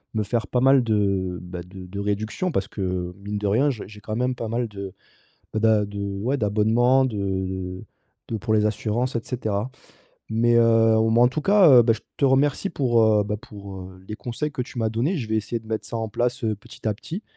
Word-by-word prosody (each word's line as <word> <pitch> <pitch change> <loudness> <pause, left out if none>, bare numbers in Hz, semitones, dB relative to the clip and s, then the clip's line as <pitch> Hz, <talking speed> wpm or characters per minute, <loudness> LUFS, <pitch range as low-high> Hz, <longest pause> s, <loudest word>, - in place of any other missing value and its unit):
me 110 - +1
faire 115 +3 -1
pas 125 - 0
mal 135 0 +5
de, 100 -5 0
bah, 90 0 -7
de 90 +1 -10
de 95 +2 -7
réduction. 105 - -2
Parce 100 -10 -1
que, 90 -4 -3
mine 105 +1 -4
de 105 - -4
rien 115 +9 +3
j'ai 120 -7 -4
j'ai 105 +1 -12
quand 110 +1 -4
même 125 +2 0
pas 115 -2 -5
mal 115 +2 -1
de 100 -2 -7 0.6
bah, 110 - 0
d'a 110 -2 +4
de 100 0 -7 0.2
ouais 125 +7 0
d'abonnement 115 +4 +3
de 125 -4 -3
de 95 -2 -3 0.4
de 115 - -3
pour 110 +1 -1
les 105 -1 +3
assurances 110 +4 -1
et 115 - 0
cetera, 110 -1 -3 0.6
mais 120 +2 +3
heu, 115 -1 +5
ou 110 0 +3
m'en 120 +2 +5
tout 145 +5 -3
cas, 180 -6 +6
heu, - - +6
bah, 115 -1 +3
je 110 - -9 0.2
te 140 - +4
remercie 135 +7 +2
pour, 120 -7 +2
heu, 105 -1 +4
bah, 105 +1 -2
pour, 100 -3 -10
heu, 95 0 -16
les 105 - -5
conseils 135 +7 -4
que 130 - -4
tu 125 - -9
m'as 110 -1 0
donnés. 125 - 0
Je 125 -8 -3
vais 110 - +2
essayer 110 +2 -2
de 110 - -19
mettre 110 0 -3
ça 115 - -4
en 115 -1 -2
place, 120 +3 -1
heu, 110 -1 +1
petit 105 +2 -12
à 110 - +2
petit, 165 - -7
110 Hz, 235 wpm, -24 LUFS, 100-120 Hz, 0.6 s, cas